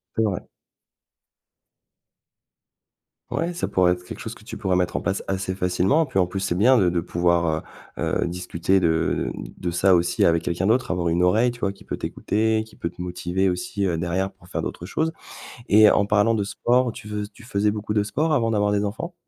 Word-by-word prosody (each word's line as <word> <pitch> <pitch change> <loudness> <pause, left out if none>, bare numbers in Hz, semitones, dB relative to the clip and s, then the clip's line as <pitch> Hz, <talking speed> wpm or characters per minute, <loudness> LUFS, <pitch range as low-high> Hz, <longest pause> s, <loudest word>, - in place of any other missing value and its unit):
C'est 115 - +2
vrai. 100 -5 -2 2.8
Ouais, 170 +2 -1
ça 175 - -2
pourrait 90 -1 +3
être 90 0 -3
quelque - - -8
chose 115 +1 -6
que 105 - -17
tu 110 - -7
pourrais 95 -4 0
mettre 90 -1 0
en - - 0
place 100 0 -1
assez 95 -1 -2
facilement, 95 - +2
puis 130 - -5
en 90 - +4
plus, 95 +1 -4
c'est 95 -3 -1
bien 125 +7 +5
de 95 -4 +3
de 85 -1 0
pouvoir, 85 -2 +1 0.4
heu - - -2 0.2
heu, - - -1
discuter 90 +1 0
de 80 -2 +1
de 90 - -6
ça 90 +2 +4
aussi 85 +1 +1
avec 85 -1 +3
quelqu'un 90 +2 -1
d'autre, 125 +4 +2
avoir 85 -2 0
une 85 +2 +2
oreille, 110 +7 +3
tu 120 - -12
vois? 100 -3 -1
Qui 95 - -17
peut - - -5
t'écouter, 110 +1 0
qui 110 - -19
peut 85 - -3
te 90 - -11
motiver 90 +1 -1
aussi, 90 +3 -2
heu, 85 -3 0
derrière 90 +3 -1
pour 95 -2 -21
faire - - -3
d'autres 85 - -5
choses 160 - -1 0.6
et 105 +1 +8
en 100 - +3
parlant 105 +2 +3
de 105 -2 0
sport, 120 +3 +1
tu 105 - -10
fais 105 -1 -4
tu 115 - -16
faisais 105 -2 0
beaucoup 105 0 -3
de 105 - +3
sport 150 +9 0
avant 115 -4 +1
d'avoir 105 -1 +1
des 105 0 +1
enfants? 140 - -4
95 Hz, 215 wpm, -23 LUFS, 90-110 Hz, 2.8 s, et